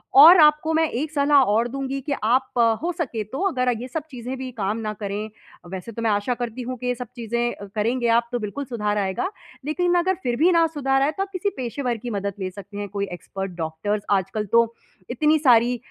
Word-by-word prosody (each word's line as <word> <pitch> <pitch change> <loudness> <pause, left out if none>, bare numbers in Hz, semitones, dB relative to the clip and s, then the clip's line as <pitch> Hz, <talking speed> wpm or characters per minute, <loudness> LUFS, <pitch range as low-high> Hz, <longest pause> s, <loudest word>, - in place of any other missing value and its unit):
और 325 +6 +10
आपको 300 +1 +5
मैं 320 0 +3
एक 295 +6 -3
सलाह 285 -2 +4
और 230 +3 +2
दूँगी 275 +1 -3
कि 285 +2 -2
आप 255 +2 +1 0.2
हो 350 - 0
सके 235 -10 -2
तो 265 - -6
अगर 255 -5 0
ये 250 - -5
सब 310 +4 -4
चीज़ें 250 +1 -6
भी 260 0 -5
काम 210 -2 -2
ना 215 -2 -3
करें, 205 +1 -4 0.4
वैसे 190 +4 -6
तो 230 - -6
मैं 225 - +1
आशा 205 +5 0
करती 240 +1 -5
हूँ 255 +1 -5
कि 250 +1 -5
ये 245 - +1
सब 245 -1 -7
चीज़ें 235 -2 -2
करेंगे 235 +3 0
आप 235 +1 +3
तो 245 - -1
बिल्कुल 225 +7 -4
सुधार 210 -4 -2
आएगा। 195 - -1 0.4
लेकिन 355 +4 +1
अगर 375 +2 +1
फिर 240 -1 0
भी 340 +5 +4
ना 335 -1 +4
सुधार 270 -4 0
आए 285 +3 +2
तो 390 +5 -2
आप 395 - -8
किसी 385 +2 0
पेशेवर 245 -1 -2
की 240 +2 -6
मदद 200 -1 -2
ले 185 -1 -2
सकते 200 +1 -10
हैं। 205 0 -3
कोई 200 0 -3
एक्सपर्ट 195 +2 -6
डॉक्टर 165 +6 -2
आजकल 200 +2 0
तो 230 0 +4 0.4
इतनी 305 +5 +3
सारी 245 -3 +4
245 Hz, 225 wpm, -23 LUFS, 210-280 Hz, 0.4 s, और